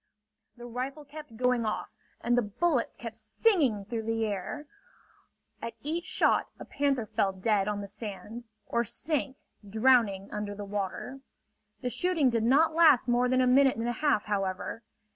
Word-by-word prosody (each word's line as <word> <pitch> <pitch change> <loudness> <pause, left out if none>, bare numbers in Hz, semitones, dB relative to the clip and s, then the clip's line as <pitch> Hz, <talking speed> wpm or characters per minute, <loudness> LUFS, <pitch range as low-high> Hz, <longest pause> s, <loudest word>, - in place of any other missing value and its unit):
The 240 - -9
rifle 260 +5 -5
kept 290 -5 -11
going 250 -1 +2
off 215 -1 -3 0.3
and 240 0 +2
the 245 - +4
bullets 245 +5 0
kept 230 -2 -8
singing 225 - +1
through 225 +2 -3
the 225 0 -1
air. 210 +8 -4 1.0
At 230 -1 -5
each 330 +4 -2
shot - - +2
a - - -8
panther 275 -4 0
fell 200 -2 0
dead 195 +1 0
on 205 -1 -2
the 200 - -6
sand 210 +3 -7 0.2
or 235 - 0
sank 260 +1 -2 0.3
drowning 220 -3 +3
under 210 -1 -4
the 205 0 -6
water. 205 +6 -4 0.6
The 250 - -2
shooting 300 +1 +2
did 230 -1 +1
not 290 +7 +4
last 315 -7 +5
more 245 +1 +2
than 255 0 +3
a - - +4
minute 265 0 +4
and 230 +1 -2
a - - +1
half, 290 -9 +3
however. 195 +1 -2
235 Hz, 165 wpm, -29 LUFS, 210-270 Hz, 1.0 s, last